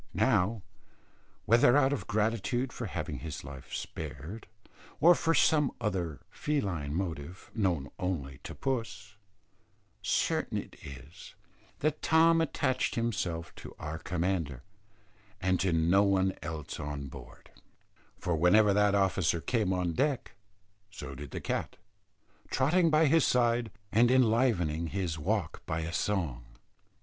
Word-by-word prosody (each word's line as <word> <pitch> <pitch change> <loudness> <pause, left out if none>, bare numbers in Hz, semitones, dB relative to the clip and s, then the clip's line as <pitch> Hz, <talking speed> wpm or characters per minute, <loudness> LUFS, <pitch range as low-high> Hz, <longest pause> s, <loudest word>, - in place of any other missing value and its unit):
Now, 105 -1 +2 0.8
whether 120 +3 +5
out 140 -1 +4
of 145 - -4
gratitude 115 +4 0
for 120 - -4
having - - -4
his 80 -3 -6
life 65 0 -10
spared, 80 +7 -6 0.5
or 170 +4 +8
for 165 -1 +1
some 150 -3 +4
other 90 -8 -2
feline 90 - -2
motive 85 -1 -5
known 90 -10 0
only 70 -7 -3
to - - -7
puss, 115 -5 -3 0.9
certain - - 0
it - - -6
is, 70 +3 -11 0.5
that 155 +1 0
Tom 165 +1 +5
attached 130 -5 0
himself 90 -8 -2
to - - -10
our 80 +1 -5
commander, 85 -7 -2 0.8
and 95 -1 +1
to 95 0 +1
no 85 +4 +4
one 95 -1 +2
else 80 -3 -6
on 70 -1 -4
board; 65 -3 -12 0.7
for 90 -2 -1
whenever 100 +6 +5
that 105 0 +3
officer 95 -4 +2
came 105 +1 0
on 90 -2 0
deck, 140 - 0 0.6
so 75 -8 -8
did 70 +1 -8
the - - -5
cat, - - -3 0.7
trotting 165 +6 +3
by 155 +1 +4
his 160 +1 +4
side 120 -2 +2 0.2
and 120 +3 +5
enlivening 110 -10 +2
his 85 -3 -3
walk 75 - -2
by 80 +1 -1
a 80 +1 -4
song. 85 -15 -1
95 Hz, 130 wpm, -30 LUFS, 80-120 Hz, 0.9 s, or